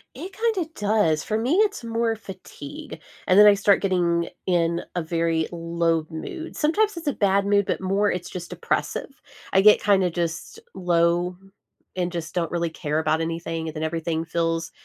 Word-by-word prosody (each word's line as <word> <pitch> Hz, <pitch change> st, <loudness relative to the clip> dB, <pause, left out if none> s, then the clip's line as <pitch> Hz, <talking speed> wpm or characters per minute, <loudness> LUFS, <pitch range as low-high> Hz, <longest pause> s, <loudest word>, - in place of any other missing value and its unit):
It 355 Hz, +9 st, -8 dB
kinda 415 Hz, -6 st, -1 dB
does. 205 Hz, -7 st, +1 dB
For 215 Hz, -, -1 dB
me, 250 Hz, +9 st, +1 dB
it's 420 Hz, -, +2 dB
more 230 Hz, 0 st, 0 dB
fatigue, 280 Hz, +9 st, -10 dB, 0.3 s
and 185 Hz, -, +4 dB
then 210 Hz, -, +9 dB
I 205 Hz, -, +9 dB
start 200 Hz, 0 st, +3 dB
getting 175 Hz, -3 st, +1 dB, 0.2 s
in 170 Hz, -1 st, +1 dB
a 175 Hz, -, 0 dB
very 165 Hz, -1 st, 0 dB
low 165 Hz, -1 st, 0 dB
mood. 245 Hz, -, -7 dB
Sometimes 405 Hz, +6 st, +1 dB
it's 335 Hz, -, -7 dB
a 290 Hz, -, +2 dB
bad 200 Hz, -2 st, +2 dB
mood, 200 Hz, 0 st, +3 dB
but -, -, -1 dB
more 200 Hz, +2 st, +1 dB
it's 180 Hz, -1 st, -4 dB
just 175 Hz, -1 st, -7 dB
depressive. 275 Hz, -, -3 dB, 0.3 s
I 190 Hz, -, +5 dB
get 210 Hz, +1 st, +6 dB
kinda 195 Hz, -3 st, +3 dB
just 170 Hz, -, -4 dB
low 175 Hz, 0 st, +1 dB, 0.6 s
and 180 Hz, -1 st, -1 dB
just 170 Hz, -1 st, -6 dB
don't 170 Hz, -2 st, -1 dB
really 170 Hz, -1 st, -1 dB
care 155 Hz, -1 st, -2 dB
about 160 Hz, 0 st, +1 dB
anything, 165 Hz, 0 st, -3 dB
and 155 Hz, -, -6 dB
then 155 Hz, -, -4 dB
everything 165 Hz, 0 st, -2 dB
feels 165 Hz, 0 st, -1 dB
180 Hz, 180 wpm, -24 LUFS, 165-210 Hz, 0.6 s, then